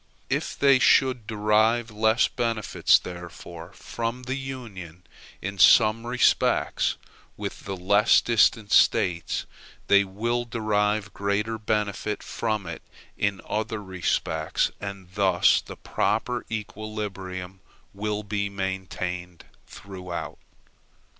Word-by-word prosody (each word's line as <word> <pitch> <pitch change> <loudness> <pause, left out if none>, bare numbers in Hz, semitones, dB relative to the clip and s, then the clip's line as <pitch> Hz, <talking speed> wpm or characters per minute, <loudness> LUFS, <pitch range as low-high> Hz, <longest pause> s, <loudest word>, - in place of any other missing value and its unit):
If - - -1
they 140 -2 +5
should 125 -4 +3
derive 110 +2 +2
less 110 +2 +3
benefit, 115 -4 +2
therefore, 85 -1 -9
from 120 +2 -5
the 130 +1 -3
Union 110 -11 -8 0.4
in 100 +1 -5
some 110 +4 +6
respects 125 +1 +2 0.4
than - - -3
the 95 -1 -4
less 100 +4 +4
distant 110 -2 +2
States, 90 -8 +3 0.4
they 100 0 +5
will 115 +5 -2
derive 105 -2 0
greater 105 +3 -1
benefit 105 -1 -2
from 110 -4 -2
it 85 -1 -6 0.3
in 100 -1 -1
other 110 0 -2
respects, 90 -4 -1
and 100 -2 -7
thus 95 -3 +3
the - - -10
proper 120 +3 -1
equilibrium 100 -4 -5 0.3
will 105 +1 -3
be 100 0 -2
maintained 90 -2 -5 0.2
throughout. 90 -2 -7
105 Hz, 105 wpm, -25 LUFS, 95-110 Hz, 0.4 s, some